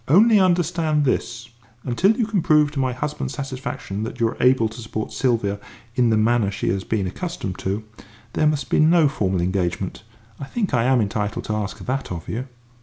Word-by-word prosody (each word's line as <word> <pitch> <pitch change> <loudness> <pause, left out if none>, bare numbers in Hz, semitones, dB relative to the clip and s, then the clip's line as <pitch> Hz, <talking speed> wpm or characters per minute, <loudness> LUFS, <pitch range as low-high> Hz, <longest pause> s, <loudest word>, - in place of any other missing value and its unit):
Only 210 - +6
understand 170 -4 +2
this 120 -2 -2 0.3
until 190 - +2
you 235 - +2
can 210 -4 0
prove 150 -2 +4
to 145 - -4
my 130 -1 +1
husband's 145 +4 -4
satisfaction 130 -7 -5
that 115 +3 -5
you 115 - +3
are - - -8
able 125 -3 +4
to 110 +2 -9
support 110 -1 -5
Sylvia 110 -6 0 0.3
in 120 -1 +3
the 110 - +3
manner 110 -1 +2
she 100 -2 -2
has 95 +1 -1
been 105 -2 -1
accustomed 100 - -5
to, 100 +3 -2 0.5
there 155 - +2
must 150 -1 -1
be - - +3
no 160 0 +5
formal 95 - 0
engagement. 90 -1 -2 0.4
I 140 - -5
think 205 - -2
I 120 -2 +3
am 130 -2 +4
entitled 105 0 -2
to 110 - -2
ask 105 -2 -3
that 135 -3 -3
of 85 -2 -6
you." 125 +4 -4
125 Hz, 195 wpm, -22 LUFS, 105-150 Hz, 0.5 s, Only